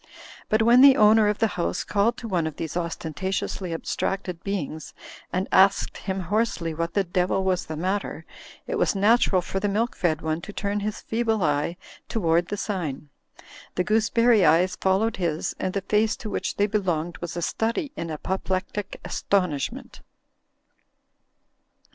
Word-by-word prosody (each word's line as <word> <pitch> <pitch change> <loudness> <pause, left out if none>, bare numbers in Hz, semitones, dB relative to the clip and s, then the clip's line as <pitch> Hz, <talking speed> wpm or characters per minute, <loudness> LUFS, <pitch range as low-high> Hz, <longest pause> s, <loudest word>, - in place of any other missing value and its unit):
But 215 +1 +3
when 240 +2 +6
the 275 -1 +8
owner 215 0 +6
of 210 0 +1
the 225 - +2 0.2
house 85 +1 -1
called 210 +4 +1
to 230 - -6
one 175 -6 0
of 155 - -6
these 160 +1 -5
ostentatiously 175 +2 -3
abstracted 180 +1 -3
beings 160 -6 -4 0.4
and 185 +2 -1
asked 195 +1 +4
him 190 -1 -3
hoarse 215 +6 0
ly 165 -1 -3
what 165 +1 -3
the 200 - +3
devil 180 +1 0
was 185 -1 0
the 155 - -5
matter, 190 +5 -2 0.4
it - - -2
was - - +2
natural 200 -2 +3
for 195 - -3
the 205 - 0
milk 225 +5 0
fed 160 -3 0
one 160 +1 -1
to 205 - -8
turn 205 0 -2
his 210 +1 -4
feeble 225 -3 0
eye 150 +3 0 0.3
toward 170 -5 +1
the 205 - -4
sign. 160 -9 -4 0.7
The 180 - +1
gooseberry 220 +1 +3
eyes 175 +3 +4
followed 195 +4 +1
his, 170 -4 -2
and 185 - -1
the 200 - -2
face 215 +3 +1
to 215 - -7
which - - -2
they 205 - +2
belonged 180 -6 -1
was 175 0 -5
a 175 - -2
study 230 - -1
in 170 - -5
apoplectic 190 +4 -3
as - - -4
tonishment. 180 -9 -1
190 Hz, 165 wpm, -25 LUFS, 170-210 Hz, 0.7 s, the